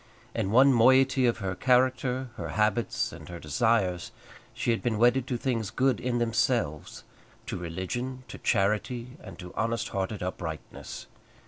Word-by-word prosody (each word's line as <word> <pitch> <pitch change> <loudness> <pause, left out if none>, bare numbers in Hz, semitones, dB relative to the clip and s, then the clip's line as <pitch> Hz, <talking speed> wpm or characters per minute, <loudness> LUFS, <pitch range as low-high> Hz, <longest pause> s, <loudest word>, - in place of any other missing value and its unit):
In 110 -4 -1
one 130 +5 +6
moiety 130 +2 +5
of 120 - +1
her 95 -4 -3
character, 130 +2 +1
her - - -5
habits, 110 +2 0
and - - -11
her 85 - -6
desires, 90 +2 0 0.4
she 120 - -1
had 115 - 0
been 115 -3 0
wedded 120 +3 +3
to 125 - -1
things 115 -5 -1
good 130 -3 +1
in 125 -1 -1
themselves, 115 - 0 0.4
to - - -4
religion, 95 +10 -4
to - - -9
charity, 115 +6 0
and - - -10
to 90 -2 -9
honest 115 0 -1
hearted 95 0 -3
uprightness. 85 -4 -6
115 Hz, 150 wpm, -28 LUFS, 95-125 Hz, 0.4 s, one